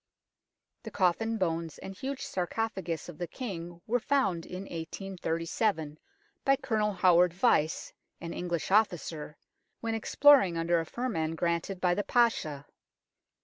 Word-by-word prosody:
The 225 - -7
coffin, 220 +4 +1
bones, 165 -4 -2
and 190 - -8
huge 270 +6 -4
sarcophagus 185 -2 -3
of 175 -4 -10
the 175 - -2
King 175 -8 -6
were 245 +3 +1
found 220 -11 0
in 180 +1 -6
1837 165 -1 -3 0.4
by 275 - +4
Colonel 215 -5 0
Howard 180 -2 +4
Vyse, 175 -6 +1 0.3
an 170 0 -6
English 175 -1 -3
officer, 170 -7 +1 0.4
when 225 -1 -2
exploring 225 - +5
under 170 +1 +2
a 165 - -4
firman 165 -11 -2
granted 170 +3 -1
by 180 -1 +3
the 205 - -1
Pasha. 190 - +1
180 Hz, 130 wpm, -30 LUFS, 165-220 Hz, 0.4 s, exploring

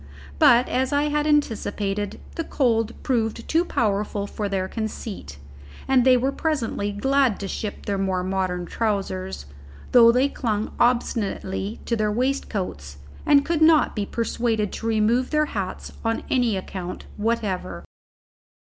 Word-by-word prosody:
But, 240 +2 +6
as 260 +1 0
I 290 +1 +2
had 295 0 0
anticipated, 210 -8 0
the 330 - -3
cold 230 -7 0
proved 230 -2 -1
too 330 +2 +3
powerful 205 - -1
for 205 0 -4
their 190 -1 -1
conceit, 210 - -6 0.5
and 265 -2 +4
they 255 0 +6
were 265 +3 0
presently 255 -10 -1
glad 265 +2 +2
to 200 - -4
ship 205 +2 -5
their 200 -1 -1
more 190 -2 0
modern 185 -1 -1
trousers, 190 - -2 0.5
though 235 -2 +8
they 255 +3 +3
clung 220 -6 -2
obstinately 220 -4 0
to 235 - 0
their 215 -1 0
waistcoats, 205 - -2 0.3
and 280 -1 +5
could 330 -1 0
not 315 -1 +5
be 205 -2 -2
persuaded 230 -3 -1
to 225 - -4
remove 225 +3 +2
their 305 0 +2
hats 195 -9 -5
on 225 0 -1
any 240 -6 +2
account 185 -1 -6
whatever. 205 - -2
225 Hz, 140 wpm, -24 LUFS, 200-255 Hz, 0.5 s, though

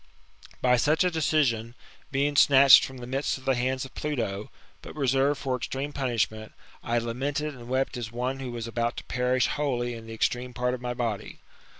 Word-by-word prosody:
By 125 -1 +5
such 155 +8 +3
a 180 - +2
decision, 130 -8 +1 0.4
being 145 +1 0
snatched 140 -1 +8
from 130 - -6
the 120 - -8
midst 135 +3 -1
of 130 - -15
the 135 - +3
hands 130 +1 -1
of 130 - -12
Pluto, 115 -9 -3 0.3
but - - -10
reserved 135 0 +1
for 130 -2 -1
extreme 135 +3 -4
punishment, 115 -5 -2 0.3
I 120 - 0
lamented 140 +6 -2
and 120 -2 -11
wept 130 0 0
as 115 -2 -5
one 125 +3 -3
who 130 -2 -5
was 120 -1 -5
about 115 +1 -2
to - - -5
perish 125 0 +1
wholly 120 -4 -1
in*the 115 -1 -9
extreme 125 +2 -1
part 125 0 0
of 125 - -5
my 125 0 -3
body. 115 -4 -3
125 Hz, 190 wpm, -27 LUFS, 120-135 Hz, 0.4 s, snatched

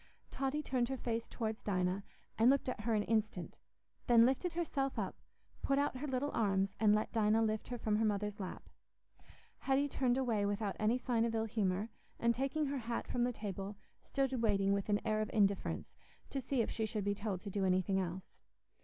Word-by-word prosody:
Totty 275 +3 -1
turned 255 -3 0
her 265 - -2
face 230 -2 -2
towards 220 -2 -3
Dinah, 185 0 0 0.3
and 225 +3 +5
looked 275 0 +3
at 255 - -2
her 225 +1 +1
an 210 - +2
instant, 215 -5 -1 0.5
then 235 -1 +7
lifted 270 +7 +1
herself 280 -5 -1
up, - - -3 0.4
put 275 - +1
out 285 -2 +1
her 295 +4 -4
little 265 +2 -1
arms, 195 -3 +1
and 210 -1 +5
let 215 - -1
Dinah 220 0 +3
lift 215 -1 -1
her 245 - -4
from 215 -2 +1
her 225 - +2
mother's 210 0 -1
lap. 185 -2 -6 0.9
Hetty 275 +1 +2
turned 255 -3 +1
away 235 -6 +1
without 205 0 -1
any 220 +3 +3
sign 240 -2 +1
of 230 -1 0
ill 220 0 +1
humour, 205 -1 0 0.3
and, 235 0 +3
taking 275 +5 0
her 280 -1 -2
hat 235 0 -3
from 245 -1 +1
the 250 - 0
table, 200 -2 -5 0.3
stood 265 -3 -1
waiting 200 -3 +3
with 200 +1 -1
an 205 0 +3
air 215 -1 +1
of 215 - -2
indifference, 200 -2 +1 0.4
to 270 - -2
see 255 -1 +1
if - - -4
she 220 -1 -1
should 215 -2 -2
be 200 +1 +1
told 205 -2 -3
to 200 - -6
do 200 0 -1
anything 185 +1 +2
else. 185 0 -3
220 Hz, 205 wpm, -35 LUFS, 205-255 Hz, 0.9 s, then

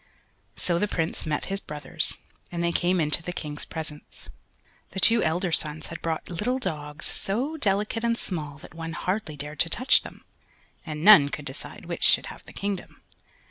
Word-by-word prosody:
So 170 -1 +1
the 210 - +1
Prince 165 -3 -2
met 150 -1 -1
his 195 0 -2
brothers, 155 -1 +2 0.3
and 170 -1 -2
they 170 - +2
came 175 +2 +2
into 150 0 +3
the 180 - -5
King's 150 -4 -5
presence. 155 -2 -7 0.6
The 190 - -2
two 230 +3 +6
elder 175 +3 0
sons 155 -1 +2
had 165 - -7
brought 165 -1 -2
little 210 +9 -1
dogs 150 - -4
so 250 +11 -1
delicate 210 -3 +1
and 230 0 +1
small 150 -9 -4
that - - -14
one 165 0 -6
hardly 185 -3 -2
dared 150 +1 -7
to 165 - +3
touch 255 +8 +4
them, - - -12 0.6
and 155 0 -4
none 155 -10 +9
could 150 0 -6
decide 135 - -7
which - - -5
should - - +5
have - - -16
the - - -10
kingdom. 200 -2 -5
170 Hz, 180 wpm, -26 LUFS, 150-200 Hz, 0.6 s, none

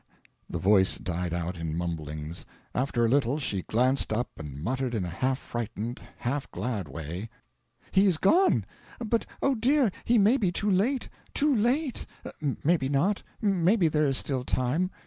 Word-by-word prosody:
The - - -3
voice 95 +2 +4
died 90 -1 -3
out 85 +1 -3
in 80 -1 -3
mumblings. 80 -2 -4 0.3
After 125 -2 +1
a - - +3
little 135 +2 +2
she 105 -10 -2
glanced 125 +7 +1
up 120 +3 -1
and 75 -3 -7
muttered 130 +3 -1
in 100 -5 -1
a - - -4
half 130 +10 0
frightened, 120 -1 -5 0.2
half 135 +3 -2
glad 110 -9 -3
way 80 +9 -6 0.6
"He 195 +1 +5
is 180 -4 +3
gone! 355 - +4 0.3
But, 230 -1 -1 0.2
oh 275 - +4
dear, 255 0 +3
he 240 - +3
may 215 +5 +5
be 195 -9 +1
too 205 +3 0
late 230 +8 +1 0.3
too 290 -1 +3
late... 250 +5 0 0.6
Maybe 150 -4 +2
not 175 +9 +1 0.2
maybe 190 -1 +3
there 150 -1 +2
is 135 -1 +1
still 130 -3 -1
time." 130 +9 0
130 Hz, 165 wpm, -28 LUFS, -, 0.6 s, He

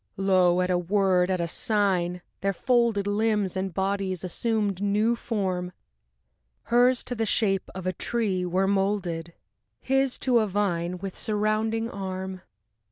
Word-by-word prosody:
VII 195 - -3
Lo! 185 -2 +4
at 180 0 0
a 180 - +2
word, 185 0 +2
at 185 -1 0
a 170 - -1
sign, 180 -3 0 0.2
their 195 0 0
folded 235 -1 +2
Limbs 205 -2 0
and 190 0 -2
bodies 190 -1 -2
assumed 205 0 -1
new 210 +3 +2
form, 185 -6 -2 0.9
Hers 245 +1 +3
to - - -4
the 225 -2 -1
shape 195 -4 +1
of 190 -1 -6
a 185 - 0
tree 200 -2 -1
were 180 +2 +1
molded, 195 -4 -1 0.5
His 270 -1 +1
to 250 -3 +4
a 215 - +1
vine 180 -3 -1
with 190 0 -6
surrounding 215 +1 0
arm.... 190 -1 -5
195 Hz, 150 wpm, -26 LUFS, 185-215 Hz, 0.9 s, Lo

